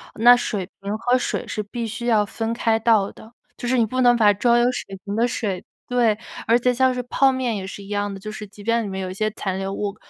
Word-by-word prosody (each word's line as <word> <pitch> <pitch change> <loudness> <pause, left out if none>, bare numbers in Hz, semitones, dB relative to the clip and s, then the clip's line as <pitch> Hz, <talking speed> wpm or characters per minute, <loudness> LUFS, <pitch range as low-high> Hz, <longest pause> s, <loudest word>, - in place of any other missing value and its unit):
那 240 +3 +7
水 210 -5 -2 0.2
瓶 200 +2 -3
和 245 +3 +2
水 - - -2
是 210 - -3
必 230 +3 -5
须 225 +2 -5
要 215 -3 +3
分 225 +2 -3
开 225 -1 +1
倒 220 -3 +3
的， 220 +2 -15 0.2
就 245 - -5
是 255 - +2
你 230 - +4
不 255 +4 -1
能 245 -1 +6
把 215 -3 +5
装 235 +4 +3
有 240 - +4
水 195 -5 -6
瓶 200 - -3
的 230 +2 +2
水 200 -6 -3 0.2
对， 235 -4 +2 0.3
而 230 - +5
且 250 +1 +2
像 260 +1 +3
是 250 - -3
泡 265 +2 +3
面 255 -4 -1
也 190 -1 -5
是 200 - -8
一 195 - -12
样 205 0 -1
的， 195 - -8
就 215 +2 -7
是 215 -1 -7
即 205 +1 -14
便 230 +2 +1
里 205 - -4
面 190 0 -4
有 185 -1 -4
一 - - -5
些 215 +3 0
残 190 -2 -3
留 195 0 -3
物。 205 -1 -3
225 Hz, 290 characters per minute, -22 LUFS, 205-240 Hz, 0.3 s, 那